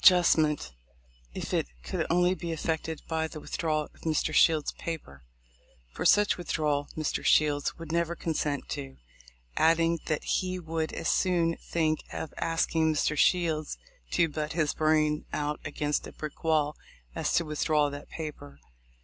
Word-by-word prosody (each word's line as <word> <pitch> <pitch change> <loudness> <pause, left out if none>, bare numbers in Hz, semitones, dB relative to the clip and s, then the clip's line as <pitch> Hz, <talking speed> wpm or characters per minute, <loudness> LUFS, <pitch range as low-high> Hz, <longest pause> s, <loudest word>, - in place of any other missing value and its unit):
justment, 155 - +5 0.6
if - - -4
it - - +1 0.2
could 65 - -2
only 180 +1 +4
be 170 -2 -5
effected 160 0 -2
by 160 -1 0
the 155 - -8
with - - -6
drawal 155 -2 0
of - - -21
Mr. 155 -1 0
Shield's 155 -1 +4
paper, 105 - -7 0.7
for - - -5
such 205 -2 +5
withdrawal 150 -4 0
Mr. 155 -2 -1
Shields 145 -2 +3
would 165 -1 -7
never 170 0 0
consent 150 -4 -2
to; 135 -2 -5 0.6
adding, 165 +1 +4
that 155 - -1
he 185 -1 0
would 160 -2 -3
as - - -4
soon 170 -3 +2
think 155 -2 0
of 155 - -5
asking 165 -1 +1
Mr. 150 0 +1
Shields 155 - +2 0.3
to 165 - +3
"butt 150 0 -3
his 155 -3 +1
brains 155 -1 +2
out 150 0 -1
against 145 0 -1
a - - -9
brick 155 -1 -7
wall 155 -2 +2 0.4
as - - -1
to 170 - +3
with 150 -1 -2
draw 150 -2 +3
that 145 0 -8
paper." 145 - -7
155 Hz, 160 wpm, -29 LUFS, 150-165 Hz, 0.7 s, justment